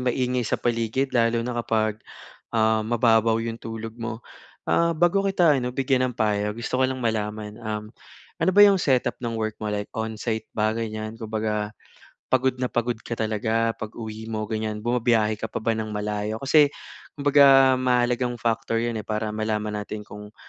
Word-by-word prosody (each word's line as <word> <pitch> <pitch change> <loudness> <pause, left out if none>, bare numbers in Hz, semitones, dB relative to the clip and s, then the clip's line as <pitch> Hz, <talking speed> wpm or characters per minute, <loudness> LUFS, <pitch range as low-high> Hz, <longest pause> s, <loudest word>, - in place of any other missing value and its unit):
maingay 125 -2 0
sa - - +1
paligid, 120 +3 -1
lalo 115 -1 +2
na 120 0 -3
kapag 110 -2 0 0.6
uh 110 0 +3
mababaw 115 -1 +3
'yong 115 0 -4
tulog 115 0 -6
mo. 115 0 -5 0.4
Uh 170 -1 +2
bago 175 +4 +3
kita 170 -8 +4
ano 125 0 -4
bigyan 130 -1 +2
ng - - -17
payo, 105 -1 0
gusto 120 +2 -3
ko 130 - +4
lang 130 -2 -4
malaman 105 -1 -2
um, 105 -1 -5 0.5
ano - - +3
ba 205 - +8
'yong 200 -2 +6
setup 130 -7 +1
ng 120 -2 -3
work 110 -1 -3
mo, 105 - -3
like 105 0 -3
onsite 110 0 -3
ba 110 0 +2
ganiyan 110 0 -4
kumbaga 110 -1 -2 0.5
pagod 130 0 +1
na 125 - 0
pagod 120 -1 -1
ka 115 - -5
talaga 110 +1 0
pag-uwi 110 0 -7
mo 110 -1 -3
ganiyan, 110 -1 -3
bumabiyahe 115 -2 +1
ka 110 - -3
pa 110 - -5
ba 115 - +1
ng 110 -1 -4
malayo? 105 +2 -3
Kasi 145 +2 +5 0.5
kumbaga 135 -2 +6
mahalagang 125 -1 +1
factor 115 0 0
'yan 115 -2 -2
eh 105 - -7
para 105 0 -2
malaman 105 -1 -2
natin 105 0 -6
kung 105 0 -11
115 Hz, 175 wpm, -24 LUFS, 110-125 Hz, 0.6 s, ba